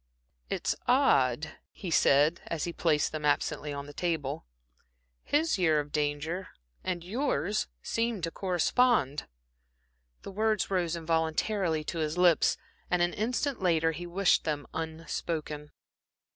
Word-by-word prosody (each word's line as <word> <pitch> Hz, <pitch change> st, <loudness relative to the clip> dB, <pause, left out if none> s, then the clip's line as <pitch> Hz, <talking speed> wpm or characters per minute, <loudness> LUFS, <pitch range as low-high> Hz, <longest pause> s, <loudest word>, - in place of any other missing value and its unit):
"It's -, -, -1 dB
odd," 150 Hz, -, +3 dB
he 180 Hz, -, -7 dB
said, 150 Hz, +2 st, +4 dB
as 165 Hz, -3 st, -2 dB
he 170 Hz, -, -3 dB
placed 155 Hz, -4 st, +1 dB
them 155 Hz, -1 st, -5 dB
absently 150 Hz, 0 st, 0 dB
on 140 Hz, 0 st, -5 dB
the 145 Hz, -, -10 dB
table, 150 Hz, -, -2 dB, 0.8 s
"his 300 Hz, -6 st, +1 dB
year 160 Hz, -4 st, +4 dB
of 145 Hz, 0 st, -5 dB
danger 150 Hz, +5 st, -2 dB, 0.4 s
and 175 Hz, -2 st, -2 dB
yours 205 Hz, -, -1 dB, 0.2 s
seem 230 Hz, -2 st, -1 dB
to 165 Hz, 0 st, -2 dB
correspond." 185 Hz, -, +1 dB, 1.0 s
The -, -, -7 dB
words 215 Hz, -1 st, 0 dB
rose 175 Hz, -3 st, +1 dB
involuntarily 165 Hz, +1 st, 0 dB
to 165 Hz, -, -4 dB
his 155 Hz, +1 st, -1 dB
lips, 175 Hz, -3 st, +4 dB, 0.3 s
and 180 Hz, -1 st, +2 dB
an 175 Hz, -, +1 dB
instant 245 Hz, +3 st, -1 dB
later 165 Hz, -3 st, +3 dB
he 175 Hz, +2 st, -6 dB
wished 185 Hz, +2 st, +3 dB
them 150 Hz, -2 st, -2 dB
unspoken. 160 Hz, -2 st, -4 dB
165 Hz, 130 wpm, -29 LUFS, 150-190 Hz, 1.0 s, said